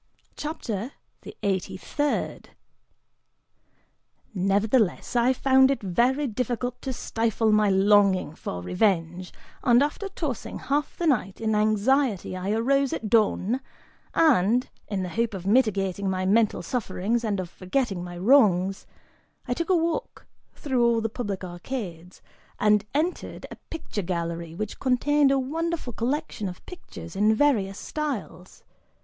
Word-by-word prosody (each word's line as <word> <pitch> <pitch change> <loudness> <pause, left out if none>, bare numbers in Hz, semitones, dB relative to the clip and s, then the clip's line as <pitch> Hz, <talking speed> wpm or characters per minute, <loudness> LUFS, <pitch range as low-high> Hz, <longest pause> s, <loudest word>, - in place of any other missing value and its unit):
CHAPTER 260 - -4 0.3
THE - - -11
EIGHTY 190 -1 -1
THIRD. 290 +10 -2 1.8
(Nevertheless, 200 +4 +1
I 240 +1 +4
found 265 0 +4
it 275 -5 -1
very 245 +10 +2
difficult 245 0 -3
to 265 - -3
stifle 225 -2 0
my 210 -1 +4
longing 195 -4 +4
for 90 - -6
revenge, 180 - 0 0.3
and 245 0 +5
after 350 +7 -3
tossing 300 - -4
half 290 +2 -2
the 345 - -2
night 225 - +1
in 220 -1 0
anxiety, 215 0 +1
I 185 +1 -4
arose 270 +5 +2
at 215 -2 -4
dawn 220 +1 +2 0.6
and, 245 - +4 0.2
in 195 -3 -2
the 180 - -4
hope 230 +1 -1
of 185 -1 -7
mitigating 200 -4 +1
my 185 0 -1
mental 210 -2 +2
sufferings 225 +1 -1
and 205 -3 -1
of 185 - -3
forgetting 195 -1 -2
my 175 0 -7
wrongs, 195 -4 +3 0.6
I 245 - +1
took 335 +7 -3
a 370 - +5
walk 335 +9 -2 0.3
through 260 -5 0
all 235 -1 +3
the 225 - -1
public 205 -4 -4
arcades 180 -1 -7 0.4
and) 210 -1 +3
entered 330 +5 -2
a - - -7
picture 315 -10 -5
gallery, 170 -2 -4
which 215 +3 -5
contained 275 +3 +3
a 275 - +3
wonderful 310 0 -2
collection 240 -4 -2
of 180 - -11
pictures 195 - -10
in 210 +2 +3
various 215 -8 +2
styles. 270 -11 -5
220 Hz, 135 wpm, -26 LUFS, 190-265 Hz, 1.8 s, and